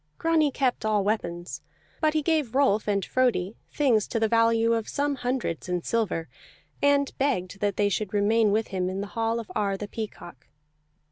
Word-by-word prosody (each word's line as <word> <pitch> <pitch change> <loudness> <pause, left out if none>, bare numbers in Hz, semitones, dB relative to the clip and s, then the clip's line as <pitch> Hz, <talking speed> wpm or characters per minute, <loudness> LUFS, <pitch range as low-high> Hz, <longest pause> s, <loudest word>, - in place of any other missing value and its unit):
Grani 325 -2 +2
kept 260 -2 -1
all 215 -2 +1
weapons; 180 -4 -3 0.4
but 310 -1 +1
he 310 - +1
gave 300 -7 0
Rolf 240 -7 +3
and 200 -2 0
Frodi 235 -6 +1 0.2
things 245 -8 +2
to 230 - -2
the 220 - +2
value 230 0 +3
of 225 -1 -2
some 285 0 0
hundreds 245 -9 -3
in 180 -1 -1
silver, 205 -8 -1 0.5
and 285 -1 +2
begged 195 -9 -1
that 205 -1 0
they 205 - +3
should 205 0 -2
remain 210 +1 +3
with 220 +2 0
him 185 -2 -1
in 190 +1 -3
the - - -3
hall 225 0 0
of 225 - -8
Ar 200 -1 0
the 205 - -6
Peacock. 185 - -8
225 Hz, 185 wpm, -26 LUFS, 200-255 Hz, 0.5 s, Rolf